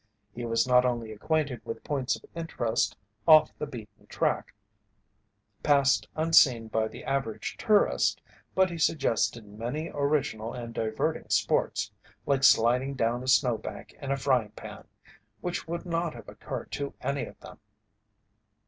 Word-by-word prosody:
He 120 0 -5
was 115 +1 +1
not 125 0 +5
only 120 -3 -1
acquainted 140 +2 -1
with 115 - -6
points 135 -3 -1
of - - -13
interest 120 -8 -1 0.3
off 155 -1 +8
the 150 - -3
beaten 110 -7 -11
track - - -1 1.1
passed 140 -2 +3
unseen 140 -8 +4
by 110 0 0
the - - -10
average 115 -6 -2
tourist, 210 -2 +2 0.4
but 190 -1 +3
he 170 - -5
suggested 120 -7 +1
many 120 +10 -5
original 140 -6 -1
and 120 -1 -6
diverting 110 -1 -2
sports - - +1 0.3
like 135 -1 +1
sliding 125 +2 +4
down 120 -1 0
a 130 - -7
snowbank 125 -3 +1
in 140 - -5
a 140 - +1
frying 130 -5 +1
pan - - -10 0.5
which 175 -2 -4
would 170 +2 -4
not 170 -1 -1
have - - -11
occurred - - -7
to 140 -1 -4
any 140 0 -1
of - - -14
them. - - -12
130 Hz, 145 wpm, -28 LUFS, 115-150 Hz, 1.1 s, off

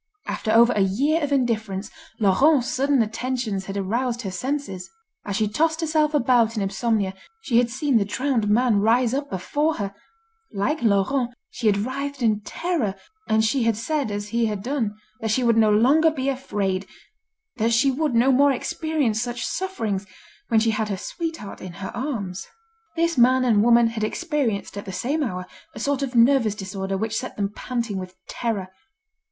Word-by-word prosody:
After 215 - -2
over 235 +2 +6
a - - -1
year 275 - +2
of 290 -1 -2
indifference, 220 -7 -1 0.3
Laurent's 245 +7 +4
sudden 275 -2 +2
attentions 230 -3 -3
had 195 0 -5
aroused 235 +5 -1
her 195 - -4
senses. 195 -3 -4 0.4
As 200 - -3
she 215 +1 +1
tossed 320 +9 +1
herself 310 -2 +1
about 240 -4 +3
in 205 - 0
insomnia, 200 0 0 0.3
she 235 - +3
had 240 -1 +1
seen 260 +1 +1
the - - +2
drowned 235 0 0
man 225 -1 +3
rise 235 +3 +3
up 280 +1 -2
before 295 - -1
her; 200 -1 -4 0.6
like 240 +9 -1
Laurent 240 +4 +1 0.2
she 230 - -2
had 205 -1 +4
writhed 270 +4 -3
in 215 -2 +2
terror, 285 - -2 0.3
and 220 0 +3
she 260 +4 +1
had 230 -2 +1
said 285 +2 -1
as 205 0 -4
he 230 +1 +1
had 205 -2 -4
done, 235 -5 -2 0.2
that 220 - -3
she 250 +4 +1
would 235 -1 +3
no 220 -1 +4
longer 270 +10 +5
be 275 -3 -2
afraid, 200 -8 -2 0.7
that 230 0 +1
she 260 +4 +4
would 290 -1 -1
no 245 +4 +4
more 280 +2 +5
experience 275 -4 -1
such 240 0 -3
sufferings, 220 - -3 0.4
when 225 - +3
she 225 +1 +2
had 215 0 -1
her 195 - -2
sweetheart 325 - -6
in 185 -2 -7
her 190 +4 -7
arms. 225 -8 -4 0.5
This 335 -3 +1
man 255 +1 +5
and 220 -4 +4
woman 235 +1 +5
had 230 -1 -2
experienced 260 - -2
at 200 - -9
the 190 - -6
same 275 - -1
hour, 185 -9 -3 0.3
a - - -7
sort 280 -1 0
of 265 -2 -3
nervous 235 -3 +4
disorder 195 -1 -4
which 220 +2 -2
set 255 - -5
them 200 -1 -1
panting 235 -6 -3
with 185 0 -8
terror. 210 -6 -3
235 Hz, 180 wpm, -23 LUFS, 205-270 Hz, 0.7 s, over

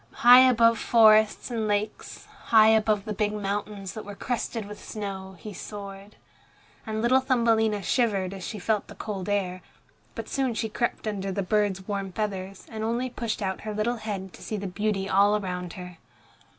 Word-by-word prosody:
High 250 +1 +9
above 230 -1 +4
forests 220 0 +4
and 225 -2 -1
lakes, 210 +1 -3 0.2
high 220 -1 +6
above 215 -2 +2
the 215 - -3
big 210 +1 -1
mountains 200 -1 -4
that 215 - -7
were 205 0 -9
crested 235 -1 -3
with 210 0 -10
snow, 195 -3 -6
he 210 +3 -9
soared. 200 +1 -9 0.7
And 220 0 -2
little 255 +2 +5
Thumbelina 225 -5 +2
shivered 195 -5 0
as 190 -2 -8
she 215 - -5
felt 210 +1 -1
the - - -11
cold 205 -2 -5
air, 185 -3 -1 0.5
but - - -6
soon 265 -4 -1
she 220 - -2
crept 235 +2 -2
under 195 -2 -3
the 195 +1 -2
bird's 195 -1 0
warm 200 -2 -3
feathers, 195 -1 -4
and 220 -1 -5
only 240 +3 -1
pushed 230 -4 -3
out 190 -1 -3
her 215 -1 -5
little 235 +3 0
head 200 -4 -5
to - - -14
see 215 - -4
the 200 - -5
beauty 195 +1 -1
all 200 +2 +4
around 180 -3 -5
her. 180 -2 -9
210 Hz, 180 wpm, -26 LUFS, 195-220 Hz, 0.7 s, High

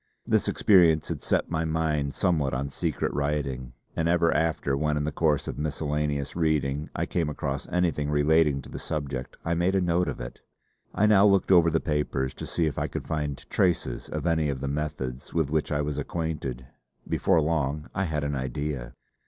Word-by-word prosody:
This - - +2
experience 85 -6 +4
had - - -3
set - - 0
my 80 0 0
mind 80 -3 0
somewhat 75 -8 +1
on 70 +2 -2
secret - - -1
writing, 70 -4 -2 0.2
and 80 +1 +1
ever 85 -1 +3
after 80 -3 +1
when 75 +1 0
in 75 - 0
the 75 - -1
course 75 -1 +1
of - - -5
miscellaneous 75 -1 -2
reading 75 -3 0
I - - 0
came 85 -3 -1
across 70 -2 -3
anything 85 -5 0
relating 75 -1 +3
to - - -12
the - - -6
subject 70 -5 -4
I 85 - +1
made 85 +3 +1
a - - +4
note 90 -1 +1
of - - -4
it. - - -8 0.5
I 105 - +3
now 105 -1 +6
looked 100 -1 +3
over 85 -3 +6
the 80 0 +2
papers 75 -3 -1
to - - -7
see 85 - 0
if 75 - -1
I - - 0
could - - -6
find 75 -3 -3
traces 85 -9 0
of - - -4
any 80 -3 +2
of 70 -2 -2
the 70 - -3
methods 70 -3 -4
with 80 -4 +1
which 80 -1 0
I 75 0 +1
was 75 0 -2
acquainted; 75 -5 -3 0.4
before 85 - +2
long 75 -1 0
I 95 +1 0
had 75 -3 -2
an 70 0 -1
idea. 65 -1 -3
75 Hz, 195 wpm, -27 LUFS, 70-80 Hz, 0.5 s, now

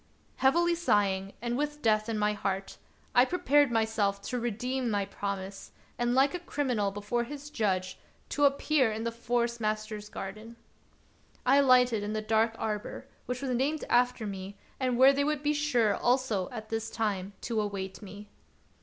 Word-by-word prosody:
Heavily 340 +6 +3
sighing, 200 - +1
and 240 0 -1
with 295 +2 -3
death 215 0 +2
in 225 - -1
my 210 0 +1
heart, 195 -1 -3 0.3
I 245 - +7
prepared 290 -2 +3
myself 220 -3 +1
to 250 - -3
redeem 245 +2 -2
my 205 -2 0
promise, 195 -1 -5 0.2
and, 240 0 0
like 270 +2 +4
a 355 - -3
criminal 255 - -1
before 205 +4 -2
his 290 +3 -8
judge, 185 -6 -1 0.3
to 290 - +2
appear 280 -3 +3
in 220 +1 -4
the 230 - -1
Forest 235 0 -1
master's 215 -1 -3
garden. 215 +5 -7 0.9
I 265 +3 +5
alighted 250 -5 +5
in 205 +1 -3
the 215 - -1
dark 225 +1 +2
arbor, 210 -1 -4 0.2
which 250 +2 -3
was 265 - -1
named 275 +5 0
after 245 -2 +2
me, 195 0 -6 0.2
and 255 -2 0
where 265 +2 +7
they 280 +1 +1
would 300 0 -1
be 295 0 +2
sure 255 -8 +2
also 245 -7 +1
at 220 -3 -8
this 225 0 -2
time 200 -3 -2
to 225 -2 -1
await 195 -2 -4
me. 205 +1 -10
230 Hz, 170 wpm, -29 LUFS, 205-260 Hz, 0.9 s, I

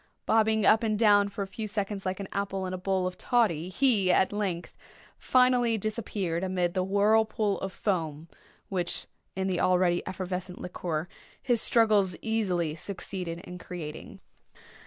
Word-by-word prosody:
Bobbing 220 -1 +3
up 220 - +5
and 215 -2 0
down, 205 -2 +5
for 200 0 -4
a - - -7
few 215 +2 -5
seconds, 200 -2 -3
like 185 +1 -2
an 200 - -5
apple 195 -1 -2
in 185 - -4
a - - -2
bowl 190 0 0
of 185 0 -4
toddy, 195 -9 +1
he, 205 -4 +3
at 190 +2 +3
length, 190 -5 -3 0.4
finally 250 -3 +3
disappeared 200 -5 -3
amid 180 -2 0
the 185 - 0
whirlpool 210 +2 +2
of 195 - -4
foam 165 -6 -2 0.4
which, 180 -3 -2 0.3
in 190 0 -1
the 185 -2 0
already 180 -1 +3
effervescent 185 0 -5
liquor, 175 -2 -4 0.3
his 240 -4 +1
struggles 210 -7 +4
easily 185 -8 0
succeeded 175 0 -5
in 180 0 -9
creating. 160 -4 -8
195 Hz, 155 wpm, -28 LUFS, 180-215 Hz, 0.4 s, up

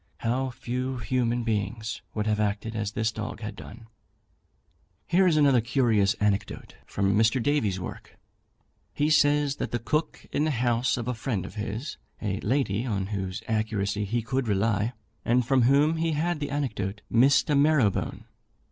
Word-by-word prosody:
How 130 +3 0
few 125 +1 -4
human 120 0 0
beings 110 0 -2
would 105 -1 -1
have 105 -1 +1
acted 105 +2 -1
as 105 -1 -2
this 110 -1 0
dog 110 +3 -6
had 105 -1 -5
done! 115 +3 -11 1.2
Here 185 +2 +3
is 160 -3 +3
another 140 -5 +5
curious 110 -5 +2
anecdote 105 -1 -2
from 100 0 0
Mr. 110 +4 +3
Davy's 115 -8 +1
work. 90 - -8 0.8
He 150 +2 +1
says 145 -1 +3
that - - -3
the 120 - -1
cook 150 +8 -2
in 150 - +1
the 155 - +1
house 120 0 +1
of 120 -1 -4
a 125 - 0
friend 110 -5 -3
of - - -9
his, 110 +6 -5 0.2
a 100 -2 -2
lady 115 -3 0
on 100 -6 -1
whose 95 -2 -4
accuracy 105 -2 -1
he 115 +3 -1
could 130 +1 -1
rely, 105 +2 +1 0.3
and 125 +1 +2
from 130 +1 +3
whom 145 +6 +4
he 165 0 0
had 160 +2 -1
the 145 -1 -3
anecdote, 110 -8 -3
missed 135 +7 +4
a - - +4
marrow 140 -7 +4
bone. - - -5
115 Hz, 170 wpm, -27 LUFS, 105-135 Hz, 1.2 s, another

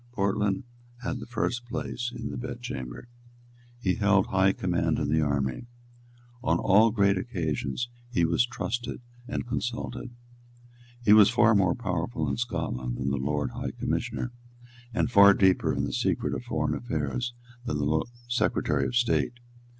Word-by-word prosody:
Portland 100 0 0 0.4
had 130 +1 -2
the 115 - -8
first 120 0 -1
place 120 0 -3
in 115 -2 -5
the - - -5
bed 120 0 -5
chamber. 65 - -6 0.7
He 95 -6 +1
held 100 -2 +3
high 95 0 +3
command 90 -2 0
in 70 - -1
the 80 +1 +3
army. 70 - -1 0.8
On - - +2
all 105 +4 +5
great 100 -3 +2
occasions 85 - -2 0.2
he 85 -9 +2
was 85 +7 +3
trusted 120 -1 -3 0.3
and - - -3
consulted. 120 +1 -3 1.0
He 105 - +7
was 105 -2 +8
far 115 - +4
more 95 -4 +3
powerful 95 -3 -2
in - - -1
Scotland 65 - -2
than 65 +1 -1
the 70 - 0
Lord 75 +2 -1
High - - -4
Commissioner, 120 - -2 0.6
and 120 0 0
far 100 -2 +8
deeper 95 -2 +3
in - - -1
the - - -2
secret - - 0
of - - -4
foreign 75 -1 -1
affairs 120 - -2 0.3
than 75 - -1
the 75 +2 +1 0.2
Secretary 120 +1 +1
of 125 - -4
State. 120 0 +2
100 Hz, 155 wpm, -27 LUFS, 80-120 Hz, 1.0 s, was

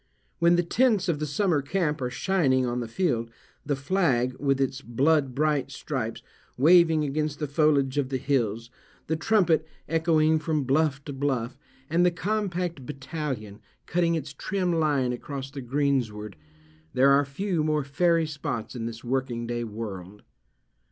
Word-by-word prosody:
When 170 0 +5
the 175 - +2
tents 210 +1 +2
of 165 -4 0
the 155 - -2
summer 160 0 +1
camp 150 0 -1
are 125 - -1
shining 130 -2 +1
on 120 0 -1
the 120 - -4
field—the 120 0 -3
flag, 135 -5 +1
with 135 -1 +1
its 135 0 -1
blood 135 +2 +1
bright 150 -1 +1
stripes, - - -4 0.3
waving 165 +2 +5
against 150 +1 -1
the 150 - -2
foliage 145 -2 +2
of 130 -2 -1
the 135 - -1
hills—the 125 +2 -3
trumpet 175 -4 +3 0.2
echoing 160 -1 +3
from 155 -1 -1
bluff 140 +1 +1
to 145 - -5
bluff, 130 -3 -1 0.3
and 170 +4 +2
the 180 - +5
compact 180 -4 -2
batallion 130 -6 -5 0.3
cutting 170 -1 +1
its 145 -2 -4
trim 180 +3 -1
line 145 -6 +1
across 135 +2 -6
the 135 0 -6
greensward—there 105 - -1
are 140 +1 +5
few 165 +4 -2
more 155 -1 +1
fairy 165 +4 +2
spots 140 -7 -4
in 115 -2 -3
this 115 0 -8
working 125 -2 -2
day 120 0 -2
world. 105 -3 -7
140 Hz, 150 wpm, -26 LUFS, 125-160 Hz, 0.3 s, When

